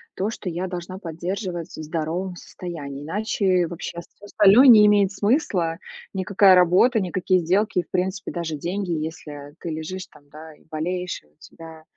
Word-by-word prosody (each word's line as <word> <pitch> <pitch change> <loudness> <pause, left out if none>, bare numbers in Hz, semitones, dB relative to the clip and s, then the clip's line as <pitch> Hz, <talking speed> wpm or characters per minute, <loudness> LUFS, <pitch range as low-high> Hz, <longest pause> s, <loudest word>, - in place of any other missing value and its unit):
то, 195 +3 -1
что 220 -4 -5
я 175 +3 -3
должна 180 0 -6
поддерживать 175 0 -5
в 155 - -7
здоровом 165 +4 -3
состоянии, 150 -6 -8
иначе 185 0 0
вообще 170 0 -6
всё 185 +4 -14
остальное 210 +6 +6
не 215 -4 +9
имеет 205 -1 +4
смысла. 195 - 0 0.3
Никакая 190 0 +4
работа, 185 +7 +4
никакие 185 0 +1
сделки 190 +3 +1
и, - - 0
в - - -34
принципе, 190 +1 -2
даже 165 -3 -4
деньги, 180 +4 -3
если 150 -2 -6
ты 170 - -6
лежишь, 165 +4 -5
там, 145 -1 -21
да, 155 +2 -12
и - - -23
болеешь, 180 +3 -3
и - - -28
у 75 - -34
тебя 160 -1 -13
180 Hz, 170 wpm, -23 LUFS, 160-195 Hz, 0.3 s, не